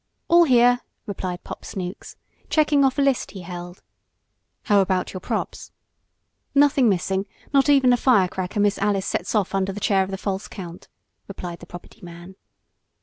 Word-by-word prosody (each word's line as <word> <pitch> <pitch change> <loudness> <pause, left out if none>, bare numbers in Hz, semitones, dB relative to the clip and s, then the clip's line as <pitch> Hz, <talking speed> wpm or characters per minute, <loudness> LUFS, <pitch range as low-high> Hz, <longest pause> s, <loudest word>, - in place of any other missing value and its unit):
"All 345 0 +6
here," 245 -2 +4 0.3
replied 185 -4 -5
Pop - - -9
Snooks, 185 -1 -7 0.3
checking 300 -2 +3
off 265 0 +2
a 280 - +3
list 275 -2 +1
he 190 - -9
held. 175 0 -9 0.8
"How 205 -1 +3
about 185 -1 -1
your 185 - -5
props?" - - -4 0.8
"Nothing 280 -3 +4
missing, 190 +1 -1 0.3
not 275 +1 +4
even 270 -3 +5
the 245 - +4
firecracker 190 -6 +1
Miss 205 0 +2
Alice 200 -1 0
sets 185 - -2
off 200 -3 0
under 195 0 0
the 200 - -7
chair 195 -1 +2
of 190 - -6
the 195 - -4
false 195 0 -4
count," 175 -3 -9 0.4
replied 180 -3 -7
the 175 - -13
property 175 0 -12
man. 175 +1 -11
195 Hz, 165 wpm, -23 LUFS, 185-245 Hz, 0.8 s, All